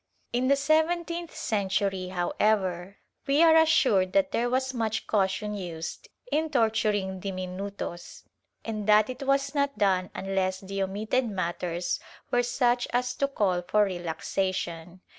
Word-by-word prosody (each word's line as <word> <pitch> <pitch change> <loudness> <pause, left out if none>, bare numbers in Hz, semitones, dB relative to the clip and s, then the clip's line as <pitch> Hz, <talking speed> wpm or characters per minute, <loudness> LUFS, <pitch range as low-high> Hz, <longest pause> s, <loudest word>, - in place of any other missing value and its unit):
In 250 +1 +1
the 280 - +5
seven 315 +4 +2
teenth 340 0 -6
century, 195 -2 -1
however, 185 0 0 0.3
we 285 +4 +4
are 325 -1 +7
assured 255 -12 +4
that 290 -1 +3
there 240 -2 0
was 260 +1 0
much 220 -2 -2
caution 210 +1 0
used 170 -5 -6 0.2
in 315 +1 +1
torturing 215 -7 +1
diminutos, 185 -1 -6 0.4
and 215 -2 -4
that 215 +2 +5
it 255 - -9
was 275 +1 +1
not 280 -1 0
done 185 -2 +2
unless 190 -1 -1
the 195 0 -4
omitted 215 +6 0
matters 175 -2 -2 0.3
were 245 - +3
such 245 0 +1
as 250 +1 0
to 275 - +1
call 195 -9 0
for 210 +4 +2
relaxation. 175 -1 -3
210 Hz, 140 wpm, -27 LUFS, 185-255 Hz, 0.4 s, are